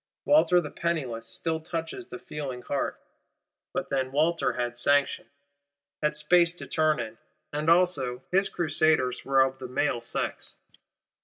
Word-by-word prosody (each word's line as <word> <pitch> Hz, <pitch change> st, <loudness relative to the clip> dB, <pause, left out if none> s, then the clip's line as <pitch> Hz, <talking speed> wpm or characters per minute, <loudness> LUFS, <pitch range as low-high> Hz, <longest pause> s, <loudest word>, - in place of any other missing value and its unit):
Walter 290 Hz, -, +5 dB
the 150 Hz, -4 st, -5 dB
Penniless 130 Hz, -10 st, -2 dB
still 160 Hz, +8 st, -1 dB
touches 165 Hz, -, -5 dB
the -, -, -7 dB
feeling 135 Hz, -, -6 dB
heart: 140 Hz, -, -2 dB, 0.7 s
but -, -, -3 dB
then 130 Hz, -1 st, 0 dB
Walter 160 Hz, +4 st, +1 dB
had 120 Hz, -1 st, -2 dB
sanction; 140 Hz, +3 st, +2 dB, 0.7 s
had 150 Hz, 0 st, +1 dB
space 170 Hz, +3 st, +4 dB
to 175 Hz, -, -8 dB
turn 155 Hz, -3 st, +1 dB
in; 110 Hz, -1 st, -6 dB, 0.3 s
and 150 Hz, +2 st, 0 dB
also 145 Hz, -8 st, +2 dB
his 195 Hz, +2 st, +3 dB
Crusaders 155 Hz, -6 st, +1 dB
were 135 Hz, 0 st, +3 dB
of 130 Hz, 0 st, +1 dB
the 130 Hz, -, -6 dB
male 125 Hz, -1 st, 0 dB
sex. 115 Hz, -, -4 dB
150 Hz, 145 wpm, -27 LUFS, 130-170 Hz, 0.7 s, Walter